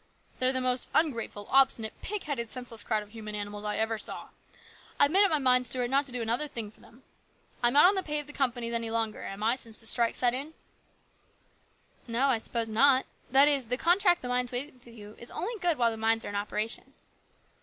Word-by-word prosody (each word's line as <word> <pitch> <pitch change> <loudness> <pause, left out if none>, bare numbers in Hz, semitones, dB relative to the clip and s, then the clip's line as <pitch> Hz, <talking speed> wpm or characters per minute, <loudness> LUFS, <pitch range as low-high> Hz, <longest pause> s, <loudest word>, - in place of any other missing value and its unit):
They're 255 0 +3
the 260 -1 -1
most 255 0 +1
ungrateful, 230 -9 0
obstinate, 255 -5 +3
pig 415 0 -4
headed, 245 -7 -4
senseless 245 -3 -3
crowd 215 -2 -1
of 210 - -18
human 215 -2 -7
animals 205 0 -6
I 210 - -2
ever 220 0 -1
saw. - - -3 0.7
I've 285 - +5
made 390 +4 +6
up 400 - +4
my 315 - +2
mind, 250 -2 +3
Stuart, 245 0 -2
not 275 +1 +2
to - - -7
do 245 -1 -3
another 235 +7 0
thing 225 -6 -5
for - - -21
'em. 245 +3 -19 0.6
I'm 240 0 +3
not 290 - +7
on 375 - +6
the 385 - 0
pay 300 -4 -3
of 295 - -3
the 295 - -12
companies 245 -4 -2
any 230 -1 -1
longer, 225 -1 -2
am 195 +2 -7
I, 230 +3 +2
since 230 -4 -6
this 225 - +4
strike 235 -2 +1
set 245 -1 +2
in? 285 +5 -3 0.5
" - - -39
" - - -36
No, 245 +4 +2
I 240 -4 +3
suppose 230 0 -2
not. 260 +4 +3 0.2
That 275 +3 +6
is, 275 -5 +1
the 250 +2 -1
contract 350 +2 +2
the - - -4
mines 250 0 0
made 260 +5 -4
with 250 -1 -23
you 215 -3 -12
is 235 - -6
good - - -9
only 445 +7 -3 0.2
while 235 -4 +2
the 225 - -6
mines 225 +1 +1
are - - -5
in 205 - -6
operation." 210 +2 -3
245 Hz, 235 wpm, -28 LUFS, 225-275 Hz, 0.7 s, not